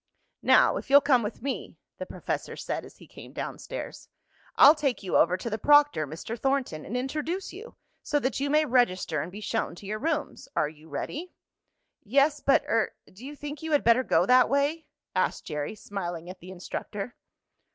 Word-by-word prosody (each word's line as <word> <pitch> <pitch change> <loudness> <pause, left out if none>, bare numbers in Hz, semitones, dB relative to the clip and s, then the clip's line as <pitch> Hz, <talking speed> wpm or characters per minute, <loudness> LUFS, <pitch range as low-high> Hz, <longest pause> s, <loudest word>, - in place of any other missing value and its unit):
"Now, - - +5
if - - -7
you'll 280 +1 +9
come 265 -4 +3
with 210 +1 -5
me," 275 -1 -4 0.2
the - - -5
professor - - -4
said - - -4
as - - -15
he - - -15
came - - -13
down - - -5
stairs, - - -7 0.5
"I'll 290 - +9
take 280 -8 -1
you 185 - -2
over 180 +2 +4
to 210 - -7
the 220 -1 -2
proctor, 290 - +4
Mr. 165 +10 -6
Thornton, 265 - -1
and 240 - -3
introduce 305 +8 -3
you, 435 +6 -10 0.3
so 295 - 0
that 260 -1 -1
you 280 +1 -1
may 305 +1 +3
register 235 - +1
and 165 +4 -6
be 205 +3 -9
shown 225 -4 -2
to 200 - -12
your 215 +2 -3
rooms. 310 +2 -2
Are 150 - +1
you 155 +1 -16
ready?" 310 - -5 0.7
"Yes, 280 +6 +3
but 275 - +3
er 225 -1 0 0.2
do 200 +6 -14
you 290 +2 -7
think 290 0 -7
you 320 -1 -3
had 290 - +3
better 235 +2 +5
go - - +2
that 255 0 +5
way?" 285 +4 0 0.3
asked - - 0
Jerry, 150 +5 -4
smiling 175 -4 -5
at 185 - -13
the 180 - -12
instructor. 195 +4 -6
250 Hz, 195 wpm, -27 LUFS, 190-290 Hz, 0.7 s, you'll